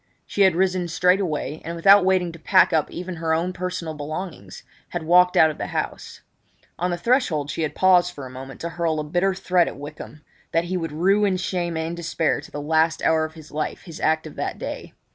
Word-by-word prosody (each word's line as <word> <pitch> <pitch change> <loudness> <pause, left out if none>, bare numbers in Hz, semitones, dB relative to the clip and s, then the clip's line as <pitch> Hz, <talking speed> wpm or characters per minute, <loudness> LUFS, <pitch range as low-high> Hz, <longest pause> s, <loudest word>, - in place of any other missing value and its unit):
She 205 - -2
had 190 -4 +5
risen 185 -1 +1
straightway, 170 -3 0
and, 170 +2 -5
without 195 +4 +6
waiting 185 -2 +2
to 165 - -12
pack 185 +1 +4
up 155 -2 +2
even 180 0 -6
her 160 0 0
own 175 +3 -1
personal 180 -3 -4
belongings, 155 +4 -7 0.3
had 175 -2 -4
walked 180 +2 +4
out 160 - +6
of 150 - -12
the - - -3
house. - - -5 0.6
On 180 +1 0
the 175 - -1
threshold 175 - +1
she - - -4
had 155 - -2
paused 180 -2 +4
for 145 -6 -9
a - - -8
moment 135 +1 -9
to 170 - -3
hurl 165 -2 -1
a - - -2
bitter 175 +5 0
threat 180 -2 +2
at - - -6
Wykham 150 +1 -10 0.3
that 165 - +2
he 180 +2 -3
would 165 -3 -3
rue 195 +7 +2
in 195 -2 +2
shame 175 -2 -2
and 160 +1 -3
despair 165 -1 -1
to - - -13
the 145 - -6
last 160 +1 +1
hour 160 -1 +3
of 155 +1 -10
his 155 -2 -13
life 155 +1 -4
his 165 -3 -10
act 160 0 +1
of 155 - -8
that - - -3
day. - - -7
170 Hz, 225 wpm, -23 LUFS, 155-180 Hz, 0.6 s, without